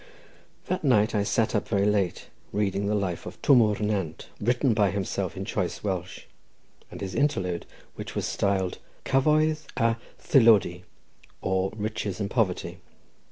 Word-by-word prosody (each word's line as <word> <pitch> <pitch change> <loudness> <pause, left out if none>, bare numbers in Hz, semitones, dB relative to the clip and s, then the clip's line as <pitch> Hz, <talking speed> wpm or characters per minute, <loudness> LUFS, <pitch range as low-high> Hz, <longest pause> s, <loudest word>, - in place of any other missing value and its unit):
That 185 -1 -2
night 110 -7 +3
I 105 - +2
sat 110 +2 +1
up - - 0
very 100 -2 +1
late 100 -4 0 0.3
reading 100 -1 0
the 105 - +1
life 95 -4 -2
of - - -9
Twm 130 -4 +7
O'r 105 -2 +2
Nant, 95 -7 -3
written 120 +3 +2
by 105 -2 +3
himself 100 -1 -3
in - - -4
choice - - -2
Welsh, 95 -3 -3 0.7
and - - -9
his 95 -1 -4
interlude, 95 - 0 0.3
which - - -8
was - - -1
styled 95 -2 0 0.3
"Cyfoeth 155 +2 +2
a 115 -1 +2 0.2
Thylody; 110 - +4 0.6
or, 95 0 0
Riches 105 -2 -3
and 100 -1 -2
Poverty." 105 -7 -1
105 Hz, 150 wpm, -26 LUFS, 95-115 Hz, 0.7 s, Twm